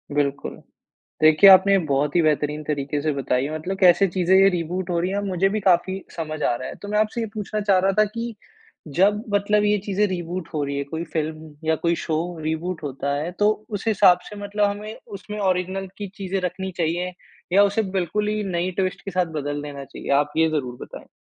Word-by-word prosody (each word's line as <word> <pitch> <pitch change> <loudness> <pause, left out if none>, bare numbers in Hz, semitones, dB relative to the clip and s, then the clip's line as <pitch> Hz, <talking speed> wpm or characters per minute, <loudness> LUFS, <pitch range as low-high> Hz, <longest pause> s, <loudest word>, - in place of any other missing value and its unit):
बिल्कुल 140 -1 -1 0.7
देखिए 155 +5 +7
आपने 190 +1 +7
बहुत 140 +1 +1
ही - - +5
बेहतरीन 150 -1 0
तरीके 145 -1 -2
से 155 0 0
बताई 130 -2 0
है 150 +2 -4
मतलब 180 +5 -4
कैसे 190 +1 +6
चीज़ें 185 +1 +1
ये 195 +1 +7
रिबूट 180 +1 -3
हो 170 - 0
रही 180 +2 -1
हैं 200 +1 -1
मुझे 195 -1 +1
भी 215 +2 -2
काफ़ी 190 0 +2
समझ 155 -2 -4
आ - - +2
रहा 130 +2 -5
है। - - -7
तो 205 - -7
मैं 210 +1 0
आपसे 215 +2 0
ये 225 - -1
पूछना 215 0 -3
चाह 200 -2 +3
रहा 190 +1 +2
था 215 - +7
कि 230 +2 -5 0.6
जब 205 +3 +4
मतलब 205 +1 +2
ये 210 0 +3
चीज़ें 205 +1 +1
रिबूट 175 -2 -4
हो 150 - 0
रही 140 0 -3
हैं 140 - -2
कोई 160 +1 -3
फिल्म 155 -1 -4
या 160 - +4
कोई 170 0 +3
शो 160 - -1 0.3
रिबूट 160 +2 -3
होता 140 0 -3
है 155 +4 -3
तो, 210 +3 0
उस 205 0 -5
हिसाब 195 -4 +5
से 210 - -9
मतलब 205 +1 0
हमें 210 +2 -5 0.2
उसमें 210 +2 -8
ओरिज़िनल 190 0 -1
की 205 -1 -5
चीज़ें 195 0 -2
रखनी 185 +1 -3
चाहिए 175 +2 -1 0.4
या 200 +2 +6
उसे 205 +2 +1 0.2
बिल्कुल 210 +4 -1
ही 215 0 -1
नई 180 -1 -1
ट्विस्ट 185 -1 -2
के 195 - -4
साथ 180 -1 +1
बदल 145 +1 -3
देना 140 -2 -7
चाहिए? - - -8
आप 145 +1 +2
ये 160 0 +4
ज़रूर 130 -6 -2
बताएँ। - - -10
180 Hz, 220 wpm, -23 LUFS, 155-200 Hz, 0.7 s, देखिए